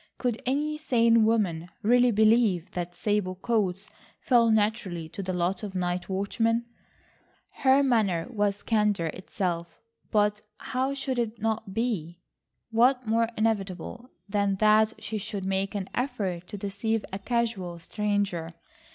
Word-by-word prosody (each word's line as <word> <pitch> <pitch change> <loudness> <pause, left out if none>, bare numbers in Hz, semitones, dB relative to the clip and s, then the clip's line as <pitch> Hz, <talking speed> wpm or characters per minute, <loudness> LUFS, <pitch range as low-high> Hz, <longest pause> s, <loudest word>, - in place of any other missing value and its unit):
Could 245 -3 -1
any 300 +3 0
sane 230 -6 +4
woman 185 -7 +1
really 245 +3 +5
believe 215 -5 +3
that 175 0 -4
sable 205 -3 0
coats 200 -2 -1 0.3
fell 235 -2 +4
naturally 205 -6 0
to 200 - -6
the 190 -1 -3
lot 180 +1 -1
of 200 -3 -6
night 180 0 -2
watchmen? 225 +4 0 0.9
Her 270 +1 +4
manner 210 -10 +2
was 205 -3 0
candour 210 -7 +1
itself, 180 -2 -4 0.3
but 210 -1 +2 0.2
how 265 +2 -2
should 265 -2 -2
it 230 -1 -2
not 220 -2 -2
be? 180 -8 -2 0.5
What 250 +3 +3
more 225 +1 +2
inevitable 215 +2 -2 0.2
than 200 -1 +1
that 215 +2 +4
she 215 -1 -4
should 205 -1 -5
make 195 +1 -1
an 195 -2 -3
effort 200 -9 -2
to 205 - -7
deceive 205 +3 -2
a 195 - -3
casual 215 -6 -1
stranger? 195 -2 -2
210 Hz, 135 wpm, -27 LUFS, 190-230 Hz, 0.9 s, really